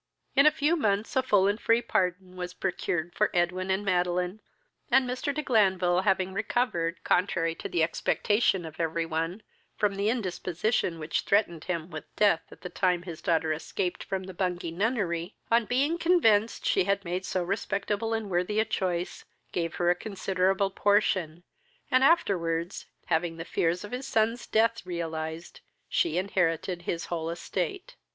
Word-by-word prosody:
In 280 +2 +7
a - - +7
few 300 +4 +1
months 210 -8 0
a 260 - +4
full 205 -7 +3
and 205 +3 0
free 230 +1 +3
pardon 185 -3 -1
was 180 0 -6
procured 175 -2 -2
for 210 +1 +2
Edwin 180 +2 0
and 190 +2 0
Madeline, 180 +1 0 0.5
and 260 0 +4
Mr. 255 +3 -2
de 305 +2 -3
Glanville, 190 -7 +3
having 190 -1 +1
recovered, 195 -5 -1
contrary 170 -3 +1
to - - -7
the 165 - +1
expectation 190 +3 +1
of 160 -1 -10
every 165 0 0
one, 165 +5 -3 0.3
from 205 -1 +2
the 200 +2 0
indisposition 185 -4 -1
which 155 0 -1
threatened 185 -6 +1
him 170 -1 -3
with 155 -2 -6
death 200 -6 +4
at - - -15
the 180 - -5
time 180 -2 +1
his 170 -3 -8
daughter 160 -2 +1
escaped 175 +3 -3
from 190 -1 -3
the 190 0 -8
Bungay 180 -2 -2
nunnery, 190 -3 -1 0.2
on 230 0 +4
being 280 +9 +1
convinced 230 - +3
she 180 - +3
had 200 0 0
made 180 +2 -2
so 185 -1 -1
respectable 200 +3 -2
and 225 -2 -1
worthy 180 +4 +1
a 220 - +3
choice, 180 -4 -2 0.3
gave 165 -2 -2
her 175 0 +2
a - - +5
considerable 195 0 0
portion, 190 -5 +1 0.5
and 255 +1 +5
afterwards, 175 - +1 0.2
having 165 0 0
the 165 - -6
fears 175 +2 0
of 205 - -8
his 255 +2 -4
son's 230 0 +1
death 230 +1 +2
realized, 165 -2 -5 0.3
she 340 - +1
inherited 180 -2 0
his 170 -1 -3
whole 165 -2 -3
estate. 170 +1 -4
185 Hz, 165 wpm, -28 LUFS, 170-215 Hz, 0.5 s, In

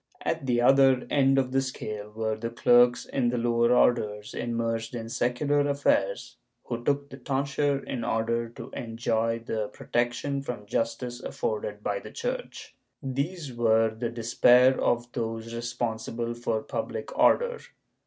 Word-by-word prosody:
^ - - -27
At 135 - -2
the 120 -1 +2
other 135 0 +5
end 135 -1 +4
of 130 -1 +1
the 135 +1 +2
scale 105 -5 -5
were 110 0 -2
the 115 +2 -4
clerks 120 +1 +4
in 125 -3 0
the 125 - -1
lower 120 0 +2
orders, 105 -4 +2
immersed 115 0 -2
in 115 -1 -5
secular 125 +5 +1
affairs, 285 - 0 0.3
who 120 -1 -5
took 140 +1 0
the 135 - -8
tonsure 140 +2 0
in 120 -3 -4
order 115 +1 0
to 115 +1 -10
enjoy 115 -1 -1
the 110 -2 -2
protection 120 +6 -2
from 125 -6 -6
justice 120 +3 -2
afforded 475 +1 -3
by - - -1
the - - -10
Church. - - -5 0.3
These 140 +2 -3
were 115 -1 +3
the 115 +1 -3
despair 120 +2 +4
of 120 0 0
those 115 -1 -4
responsible 115 -1 -3
for 115 -2 -2
public - - -5
order. 485 -1 +3
120 Hz, 150 wpm, -27 LUFS, 115-135 Hz, 0.3 s, other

